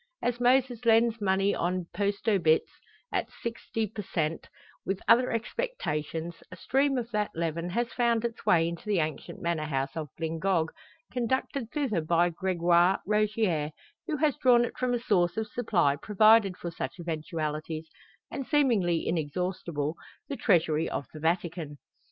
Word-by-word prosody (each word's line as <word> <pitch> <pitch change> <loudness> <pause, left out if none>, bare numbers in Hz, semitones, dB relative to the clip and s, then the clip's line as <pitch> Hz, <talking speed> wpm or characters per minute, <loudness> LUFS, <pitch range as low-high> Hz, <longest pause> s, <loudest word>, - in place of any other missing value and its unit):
As 245 0 0
Moses 245 -1 +2
lends 230 0 +4
money 195 0 +2
on 180 0 -1
post 200 +3 -2
obits, 170 -7 +3 0.4
at - - 0
"shixty 230 -1 -4
per 210 +1 -6
shent," 165 -4 -2 0.4
with 195 0 -2
other 240 +3 +5
expectations, 170 - -3
a - - -7
stream 270 +8 +1
of 240 -1 -3
that 210 -1 0
leaven 165 +1 -2
has 235 +5 -1
found 235 -2 +2
its 235 -1 -4
way 165 -1 +4
into 170 0 -5
the 210 -2 +1
ancient 155 -3 -3
manor 170 -2 0
house 135 -1 -2
of 155 -3 -4
Glyngog, 165 +1 0 0.4
conducted 250 0 -1
thither 250 - -1
by 170 +2 +2
Gregoire 175 0 +3
Rogier, 210 -7 +1 0.4
who 310 -3 -1
has 300 -2 +1
drawn 240 -2 +5
it - - -7
from 250 -1 0
a - - -1
source 180 -6 +1
of 220 - 0
supply 205 -11 +1
provided 215 0 +4
for 170 - -5
such 135 0 -5
eventualities, 155 -1 -4 0.4
and 275 - -5
seemingly 220 - +2
inexhaustible 165 -1 -2 0.3
the 280 - -3
treasury 160 - +2
of 140 - -3
the 155 - -8
Vatican. 165 -2 -1
185 Hz, 150 wpm, -28 LUFS, 165-230 Hz, 0.4 s, other